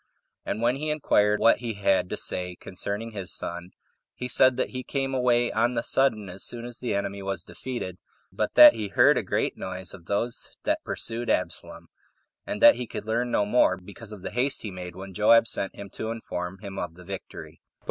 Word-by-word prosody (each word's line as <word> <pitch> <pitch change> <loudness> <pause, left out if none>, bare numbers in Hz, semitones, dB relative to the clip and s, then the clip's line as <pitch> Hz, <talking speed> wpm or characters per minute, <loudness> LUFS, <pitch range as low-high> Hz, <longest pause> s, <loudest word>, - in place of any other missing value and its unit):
And 110 - -2
when 120 +3 +2
he 155 +2 -3
inquired 105 -9 +2
what 115 - +5
he 115 -2 -3
had 95 -2 +2
to - - -3
say 90 -1 -4
concerning 100 +4 -4
his 100 -4 -3
son, 85 +1 -4 0.5
he 125 - -4
said 130 0 +4
that - - -1
he 130 - -4
came 135 0 -2
away 120 -2 +2
on 120 +3 +1
the 115 - 0
sudden 115 -7 +2
as 95 +2 -5
soon 120 -1 -4
as 120 -1 -7
the 125 - -2
enemy 100 0 -3
was 95 0 -3
defeated, 120 -8 -6 0.3
but - - -2
that - - +11
he 110 -2 -3
heard 100 - +5
a - - +1
great - - -1
noise 95 -1 -6
of 90 -4 -12
those 115 +5 -1
that - - 0
pursued 115 +1 -2
Absalom, 90 -2 -2 0.6
and - - -3
that - - +9
he 125 -1 -4
could - - -6
learn 120 +2 0
no 105 - +2
more, 105 -4 +3
because 100 +4 -10
of 100 -4 -10
the - - -4
haste 135 +3 0
he 105 - -4
made 90 -1 -8
when 95 +1 -9
Joab 110 +3 +5
sent 100 -6 -2
him 100 -1 -9
to 110 - -5
inform 95 -5 -5
him 100 0 -7
of 85 -2 -5
the 90 0 -14
victory. 95 0 -8
105 Hz, 210 wpm, -26 LUFS, 95-120 Hz, 0.6 s, that